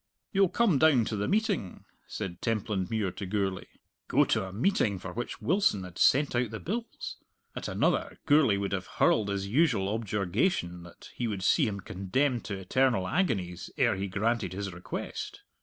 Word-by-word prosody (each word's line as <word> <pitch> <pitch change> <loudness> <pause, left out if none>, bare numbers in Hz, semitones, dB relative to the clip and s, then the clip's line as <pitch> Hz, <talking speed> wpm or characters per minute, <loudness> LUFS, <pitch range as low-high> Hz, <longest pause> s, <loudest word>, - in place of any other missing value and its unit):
"You'll 195 -2 +4
come 200 - +3
down 135 -7 +5
to 110 - -2
the 105 0 -1
meeting?" 205 - -1 0.2
said 95 -5 -5
Templandmuir 105 -2 -1
to 100 - -4
Gourlay. 95 -1 -1 0.4
Go - - +4
to - - +1
a - - -8
meeting 110 - +1
for 90 0 -7
which 120 - -5
Wilson 180 - +2
had 90 -1 -9
sent 140 0 +4
out 120 -1 +1
the 110 0 -6
bills! 230 +6 -5 0.4
At - - -4
another, - - 0
Gourlay 145 -9 +5
would 100 -1 -2
have 95 -2 -2
hurled 105 -2 +3
his 100 0 -2
usual 115 -5 +2
objurgation 100 - -1
that 85 0 -13
he 120 - -2
would 100 -4 -3
see - - +4
him 100 -2 -4
condemned 120 +9 -1
to 100 - -3
eternal 95 0 +1
agonies 95 - -1
ere 120 -4 +3
he 95 +1 -3
granted 105 +2 -1
his 95 -1 -4
request! 90 +1 -6
105 Hz, 175 wpm, -29 LUFS, 95-135 Hz, 0.4 s, down